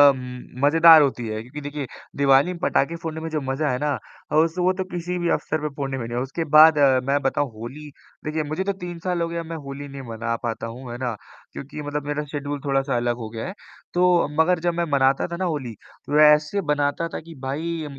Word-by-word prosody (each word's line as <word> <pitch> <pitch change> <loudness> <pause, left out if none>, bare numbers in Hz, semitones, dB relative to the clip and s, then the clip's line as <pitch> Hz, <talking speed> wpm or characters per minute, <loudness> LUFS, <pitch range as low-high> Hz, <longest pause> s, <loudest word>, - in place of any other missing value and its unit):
म 125 0 -9
मज़ेदार 165 +1 +8
होती 125 -5 0
है, 110 0 -3
क्योंकि 130 +6 -9
देखिए 145 -1 -5 0.3
दिवाली 140 +4 +4
में - - -8
पटाखे 165 +1 +1
फोड़ने 160 -1 -4
में 165 - -4
जो 155 -1 -1
मज़ा 135 +3 -1
है 125 - 0
ना, 145 -1 0 0.4
उस 165 +1 +3
वो 185 +1 +3
तो 190 - -3
किसी 180 +1 -3
भी 175 -1 0
अवसर 155 0 -1
पे 150 - -2
फ़ोड़ने 135 -2 -3
में 120 - -4
नहीं 120 +1 -4
है। - - 0
उसके 135 +5 -3
बाद 155 0 +9 0.3
मैं 140 +1 +3
बताऊँ 135 +1 0
होली 130 +7 -8 0.4
देखिए 155 0 -1
मुझे 155 +5 -2
तो 200 0 -1
3 175 -2 -7
साल 180 -1 -2
हो 165 - +1
गए 170 - -6
हैं 165 - -2
मैं 165 0 -6
होली 140 +1 -7
नहीं 135 0 -8
मना 115 +1 -2
पाता 115 0 -3
हूँ, 120 +1 -8
है 120 - -5
ना? 125 -3 -2 0.4
क्योंकि 145 +2 -7
मतलब 145 0 -4
मेरा 145 +1 -1
शेड्यूल 145 -1 -3
थोड़ा-सा 135 -1 +1
अलग 120 0 0
हो 110 -2 -6
गया 115 +5 -5
है। 185 - -6 0.4
तो 180 -2 +4
मगर 180 +1 +2
जब 175 +1 0
मैं 170 - 0
मनाता 135 +1 +3
था 170 - -5
ना 185 - -1
होली, 140 -9 -3 0.3
तो 150 +1 +1
ऐसे 150 +6 +5
बनाता 145 +3 +1
था - - -3
कि 165 0 -12
भाई 155 +3 -3
145 Hz, 235 wpm, -23 LUFS, 135-165 Hz, 0.4 s, बाद